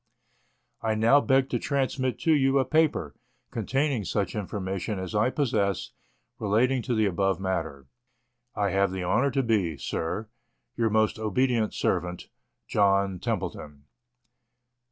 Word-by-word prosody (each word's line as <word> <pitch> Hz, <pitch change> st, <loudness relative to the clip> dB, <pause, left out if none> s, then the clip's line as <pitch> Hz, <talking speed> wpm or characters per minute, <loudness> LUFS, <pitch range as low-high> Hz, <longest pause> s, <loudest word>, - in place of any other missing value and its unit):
I 110 Hz, -1 st, 0 dB
now 115 Hz, +6 st, +5 dB
beg 135 Hz, -1 st, +3 dB
to 120 Hz, -, 0 dB
transmit 130 Hz, -1 st, -1 dB
to 160 Hz, -, +3 dB
you 135 Hz, -2 st, +3 dB
a 135 Hz, -, +3 dB
paper, 155 Hz, -1 st, +1 dB, 0.4 s
containing 135 Hz, +1 st, 0 dB
such 100 Hz, +2 st, -1 dB
infor 105 Hz, -1 st, -4 dB
mation 95 Hz, +2 st, -3 dB
as 95 Hz, 0 st, -5 dB
I 105 Hz, +4 st, +3 dB
possess, 100 Hz, -, 0 dB, 0.5 s
relating 120 Hz, +5 st, +2 dB
to 120 Hz, 0 st, -2 dB
the 110 Hz, -1 st, +2 dB
above 95 Hz, 0 st, 0 dB
matter. 80 Hz, -8 st, -3 dB, 0.7 s
I 100 Hz, -1 st, 0 dB
have 100 Hz, -1 st, +2 dB
the 95 Hz, -1 st, -3 dB
honour 120 Hz, +10 st, +2 dB
to 135 Hz, 0 st, 0 dB
be, 100 Hz, -, +1 dB
Sir, 85 Hz, +10 st, -3 dB, 0.5 s
Your 115 Hz, -1 st, +1 dB
most 110 Hz, 0 st, +1 dB
obedient 110 Hz, +1 st, +1 dB
servant, 90 Hz, 0 st, -1 dB, 0.4 s
JOHN 100 Hz, -2 st, +2 dB
TEMPLETON. 75 Hz, -3 st, -4 dB
110 Hz, 135 wpm, -27 LUFS, 95-130 Hz, 0.7 s, now